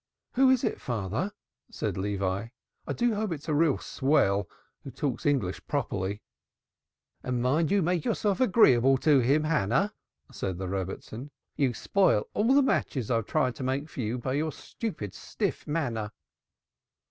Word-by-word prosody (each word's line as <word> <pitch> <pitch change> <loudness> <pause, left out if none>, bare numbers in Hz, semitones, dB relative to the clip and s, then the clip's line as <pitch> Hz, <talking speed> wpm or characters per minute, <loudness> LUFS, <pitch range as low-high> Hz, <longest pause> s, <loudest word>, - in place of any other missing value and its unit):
"Who 265 +1 +5
is 260 -2 +3
it, - - -1
father?" 115 - -2 0.4
said - - -3
Levi. 100 +1 -1 0.4
"I - - -1
do 240 -1 +1
hope 210 -2 -2
it's 155 -3 -5
a 155 - 0
real 150 -1 +3
swell 105 - +1 0.3
who - - -7
talks 135 0 -2
English 125 -11 0
properly." 105 -8 -2 1.0
"And 125 -1 -2
mind 145 +6 +2
you 200 -1 +3
make 175 -1 +1
yourself 200 -1 0
agreeable 135 - +5
to 145 0 +4
him, 140 +5 +3
Hannah," 155 - +1 0.4
said 95 -2 -3
the 95 0 -4
Rebbitzin. 95 +7 -5 0.3
"You 135 -5 +1
spoil 185 - +2
all 230 +6 +3
the 285 - +6
matches 130 - 0
I've 115 -3 +1
tried 130 -5 +1
to - - -5
make 135 +4 -1
for 135 - -5
you 115 +2 -2
by 130 +1 -3
your 155 +3 0
stupid, 150 - -6
stiff - - -3
manner." 120 -9 -2
135 Hz, 160 wpm, -28 LUFS, 110-165 Hz, 1.0 s, the